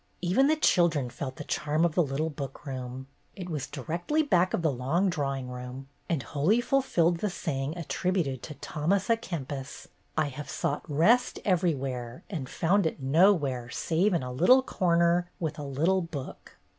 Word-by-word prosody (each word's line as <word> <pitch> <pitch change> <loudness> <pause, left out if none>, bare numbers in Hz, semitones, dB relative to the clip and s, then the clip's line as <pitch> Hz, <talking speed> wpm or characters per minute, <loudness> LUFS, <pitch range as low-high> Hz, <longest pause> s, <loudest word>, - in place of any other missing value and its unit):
Even 190 +11 +3
the 310 - +4
children 165 - +2
felt 130 0 -5
the - - -7
charm 155 +3 0
of 170 - 0
the 175 - +3
little 155 +2 -1
book 140 0 -7
room. 130 -1 -5 0.3
It 180 -2 -6
was 145 -3 -3
directly 170 - -1
back 185 - +3
of 170 - -1
the 160 - +3
long 155 +10 +1
drawing 135 -4 -2
room, 125 +2 -7 0.2
and 155 -7 0
wholly 155 - +2
fulfilled 240 - +2
the 210 - 0
saying 155 -4 -3
attributed 170 -5 -1
to 150 - -8
Thomas 185 +11 -1
a - - +6
Kempis: 145 - -6 0.3
"I 155 -2 +2
have 140 +1 -8
sought 145 - -1
rest 190 +13 +3
everywhere, 135 - -1
and 140 -8 -4
found 180 +2 +2
it 160 - -4
nowhere 140 -4 +3
save 175 - +1
in 165 - 0
a 125 - -4
little 250 - +5
corner, 175 -4 +2
with 160 -2 -3
a - - -4
little 160 +8 +1
book." 155 -6 -8
160 Hz, 170 wpm, -28 LUFS, 135-180 Hz, 0.3 s, a